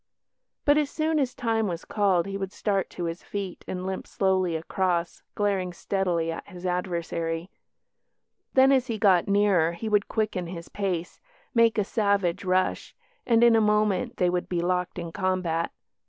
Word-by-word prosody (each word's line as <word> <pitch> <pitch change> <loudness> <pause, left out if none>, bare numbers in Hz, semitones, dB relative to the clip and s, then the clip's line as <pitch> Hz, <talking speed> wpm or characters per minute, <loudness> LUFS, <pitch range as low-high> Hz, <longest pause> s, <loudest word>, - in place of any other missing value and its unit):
But 290 +1 +5
as 295 -2 0
soon 315 0 0
as 260 -3 -1
time 225 -2 0
was 170 -2 -4
called 195 -5 +2
he 195 0 -5
would 195 -1 -3
start 200 -3 -1
to 175 - -6
his 165 +1 -3
feet 195 -3 -6
and 185 0 -4
limp 190 0 -4
slowly 185 -3 +1
across 170 +1 -1
glaring 195 -3 0
steadily 175 -3 -1
at 165 - -7
his 185 -2 -10
adversary; 170 -1 -2 1.0
then, 265 +1 +6
as 260 -2 +3
he 230 -3 -2
got 195 -4 +4
nearer, 200 -5 +3
he 220 +6 -5
would 210 -1 +2
quicken 215 -5 -1
his 170 -1 -8
pace, 180 -4 -3 0.3
make 230 -2 +4
a 210 - +3
savage 200 -4 0
rush, 185 0 0 0.3
and 230 -1 +4
in 235 -1 +6
a 225 - +4
moment 210 +3 +1
they 180 - +2
would 180 0 -2
be 175 - 0
locked 180 +1 -1
in 170 -1 -5
combat. 185 -3 -1
190 Hz, 170 wpm, -26 LUFS, 175-210 Hz, 1.0 s, then